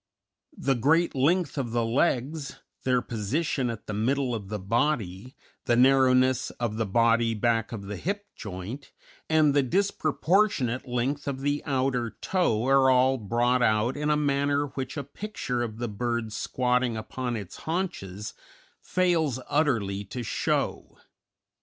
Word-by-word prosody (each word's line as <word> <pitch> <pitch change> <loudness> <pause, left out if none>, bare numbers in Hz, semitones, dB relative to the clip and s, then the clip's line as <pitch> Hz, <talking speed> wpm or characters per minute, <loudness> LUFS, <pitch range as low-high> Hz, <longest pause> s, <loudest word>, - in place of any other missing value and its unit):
The 135 - +1
great 160 +8 +2
length 155 +4 +1
of 120 -4 -3
the 120 -1 +1
legs, 135 +4 0 0.3
their 125 -1 +2
position 130 +5 -1
at 115 -3 -6
the 105 - -5
middle 125 +4 0
of 105 -4 -4
the 105 - -2
body, 110 0 -1 0.3
the 120 - +3
narrowness 130 0 +4
of 115 -3 -2
the 110 -2 -1
body 115 +2 +3
back 115 0 +1
of 110 -4 -6
the 100 0 -6
hip 205 - -3
joint, 105 +7 -7 0.4
and 155 -2 +4
the 145 - +4
disproportionate 155 - +1
length 130 +4 -2
of 135 -1 -3
the 145 +1 0
outer 130 -4 0
toe 125 - +1
are 135 0 +5
all 130 +1 +4
brought 120 +4 +1
out 110 +2 +2
in 150 +1 -1
a 150 - +3
manner 145 0 +1
which 130 +2 -5
a 140 - -2
picture 140 - -4
of 110 -2 -4
the 120 +1 -3
bird 115 0 -2
squatting 125 -1 0
upon 120 +2 -4
its 100 -5 -7
haunches 105 - -3 0.5
fails 165 -8 +1
utterly 115 -10 +1
to 120 +5 -6
show. - - -2
125 Hz, 145 wpm, -27 LUFS, 115-145 Hz, 0.5 s, are